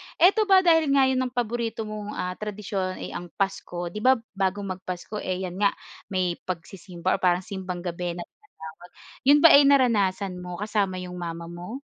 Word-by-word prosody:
eto 405 +5 +4
ba 380 -1 +6
dahil 325 -3 +4
nga 275 - +5
yun 260 -1 +1
ang 255 -1 -1
paborito 235 -2 -2
mong, 210 -1 -6
ah, 180 - -2
tradisyon 195 -3 -3
ay - - -6
ang 175 0 -6
Pasko, 175 -3 -3
'di 210 - -5
ba 260 +4 +5 0.2
bago 195 0 -1
mag-Pasko 185 +1 -5
eh 185 -1 -3
'yan 185 0 -5
nga 200 -1 +4 0.4
may 185 -3 -1
pagsisimba 180 0 -3
or - - -5
parang 180 -1 +2
Simbang 185 -2 -6
Gabi 175 -1 -3
na 175 - -5
tinatawag, 175 - -14 0.4
yun 290 +1 +7
ba - - +11
ay 285 - +8
naranasan 200 -9 +2
mo 180 0 -6
kasama 205 -1 -1
'yong 180 0 -7
mama 170 0 -6
mo? 180 +10 -7
195 Hz, 185 wpm, -25 LUFS, 180-225 Hz, 0.4 s, ba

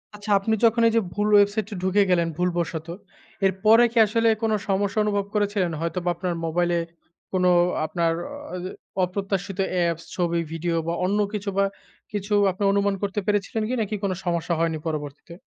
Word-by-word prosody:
আচ্ছা। 205 0 -5
আপনি 220 +3 -1
যখন 230 +1 +3
এই 225 - +1
যে 230 - +4
ভুল 205 +2 0
ওয়েবসাইটায় 205 0 +2
ঢুকে 190 +2 +3
গেলেন 170 -2 +3
ভুল 180 0 +1
বশত। 160 -1 -3 0.6
এর 190 - +3
পরে 225 +2 +7
কি 235 - -6
আসলে 230 +2 +1 0.2
কোন 225 - +2 0.2
সমস্যা 200 +2 +1
অনুভব 205 -1 0
করেছিলেন? 205 -4 0
হয়তোবা 175 +1 -2
আপনার 175 +1 -2
মোবাইলে 175 +1 +1 0.5
কোন 185 -1 0 0.4
আপনার 165 0 0 0.4
আ - - -3 0.5
অপ্রত্যাশিত 195 +1 -3
অ্যাপস 170 -2 0
ছবি 170 -2 0
ভিডিও 165 +1 -2
বা 170 - 0
অন্য 200 +3 +1
কিছু 205 -1 -3
বা 200 - +4 0.5
কিছু 205 0 -3 0.2
আপনি 195 +2 -5
অনুমান 200 0 +1
করতে 200 0 -1
পেরেছিলেন 205 +1 0
কি - - -1
নাকি 210 0 -2
কোন 200 - +1
সমস্যা 170 0 0
হয়নি 165 -1 0
পরবর্তীতে? 150 +1 -5
195 Hz, 170 wpm, -24 LUFS, 170-205 Hz, 0.6 s, পরে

